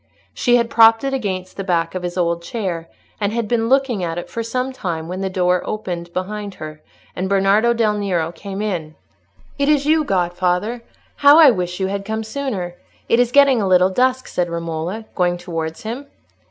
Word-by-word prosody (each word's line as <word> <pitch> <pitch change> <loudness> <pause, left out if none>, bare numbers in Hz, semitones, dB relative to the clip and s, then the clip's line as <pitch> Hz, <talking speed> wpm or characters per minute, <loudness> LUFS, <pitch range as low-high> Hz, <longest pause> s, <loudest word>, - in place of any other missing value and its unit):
She 245 -1 +2
had 235 -1 +1
propped 225 +1 +6
it 270 0 -1
against 190 -7 -3
the 195 - -3
back 170 -3 0
of 185 - -3
his 175 0 -5
old 170 -1 0
chair, 170 -4 -4 0.3
and 205 -1 0
had 230 -1 -2
been 230 0 0
looking 260 -7 +2
at 165 -1 -3
it 175 - -6
for 230 - -3
some 250 +3 -2
time, 165 -9 -4
when 185 +2 -5
the 190 - -1
door 180 -1 +1
opened 175 -5 -5
behind 200 +2 -4
her, 155 0 -9 0.3
and 185 +1 -2
Bernardo 200 +4 +3
del 225 -3 +2
Nero 175 -5 -1
came 195 +4 -6
in. 165 -7 -3 0.6
"It 280 +1 +2
is 290 -2 +3
you, 310 +1 +3
godfather! 185 +2 0 0.4
How 285 +1 +7
I 310 -5 +9
wish 180 -3 -3
you 190 - 0
had 200 +1 -3
come 220 +2 -3
sooner! 220 -7 -4 0.3
it 230 - +3
is 245 -1 +2
getting 275 -3 +5
a 195 - 0
little 185 0 +4
dusk," 255 +4 +1
said 175 -1 -1
Romola, 170 +5 -4
going 175 -1 +1
towards 165 -2 -5
him. 245 +6 -5
195 Hz, 195 wpm, -20 LUFS, 175-235 Hz, 0.6 s, I